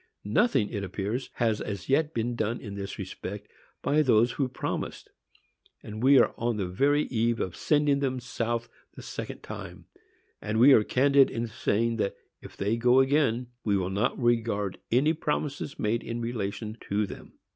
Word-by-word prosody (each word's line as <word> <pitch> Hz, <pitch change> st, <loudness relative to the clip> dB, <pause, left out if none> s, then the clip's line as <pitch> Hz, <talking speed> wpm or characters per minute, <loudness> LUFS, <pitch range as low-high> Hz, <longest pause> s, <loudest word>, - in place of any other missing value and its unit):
Nothing, 160 Hz, -, +2 dB
it 100 Hz, -3 st, -4 dB
appears, 100 Hz, +6 st, -3 dB
has 110 Hz, -3 st, 0 dB
as 100 Hz, -2 st, -5 dB
yet 150 Hz, +3 st, +2 dB
been 120 Hz, -1 st, -2 dB
done 115 Hz, +1 st, -1 dB
in 100 Hz, -, -8 dB
this 100 Hz, 0 st, -6 dB
respect 100 Hz, +1 st, -7 dB, 0.4 s
by 150 Hz, +2 st, +3 dB
those 120 Hz, -4 st, +4 dB
who 135 Hz, 0 st, -1 dB
promised, 130 Hz, -, -5 dB, 0.7 s
and 110 Hz, +1 st, -7 dB
we 135 Hz, +2 st, +6 dB
are -, -, +4 dB
on 115 Hz, -1 st, 0 dB
the 100 Hz, -, -1 dB
very 140 Hz, +11 st, +2 dB
eve 115 Hz, -1 st, 0 dB
of 90 Hz, -, -3 dB
sending 145 Hz, -2 st, +2 dB
them 130 Hz, -2 st, -1 dB
south 120 Hz, -1 st, -3 dB, 0.3 s
the -, -, -10 dB
second -, -, -7 dB
time; -, -, -8 dB, 0.6 s
and 110 Hz, +1 st, -1 dB
we 135 Hz, +4 st, +8 dB
are 110 Hz, -, +6 dB
candid 140 Hz, +3 st, +4 dB
in 115 Hz, 0 st, -3 dB
saying 115 Hz, +1 st, 0 dB
that, 100 Hz, -, -1 dB, 0.3 s
if -, -, -12 dB
they 105 Hz, +4 st, 0 dB
go 125 Hz, +2 st, +4 dB
again, 130 Hz, -3 st, +2 dB
we 100 Hz, -2 st, +2 dB
will 95 Hz, 0 st, -2 dB
not 105 Hz, +8 st, 0 dB
regard 115 Hz, -5 st, 0 dB
any 140 Hz, +7 st, +4 dB
promises 150 Hz, -2 st, -3 dB
made 110 Hz, +2 st, 0 dB
in 115 Hz, 0 st, -5 dB
relation 110 Hz, -1 st, -4 dB
to 105 Hz, +1 st, +1 dB
them. 95 Hz, -, -10 dB
115 Hz, 175 wpm, -28 LUFS, 105-130 Hz, 0.7 s, we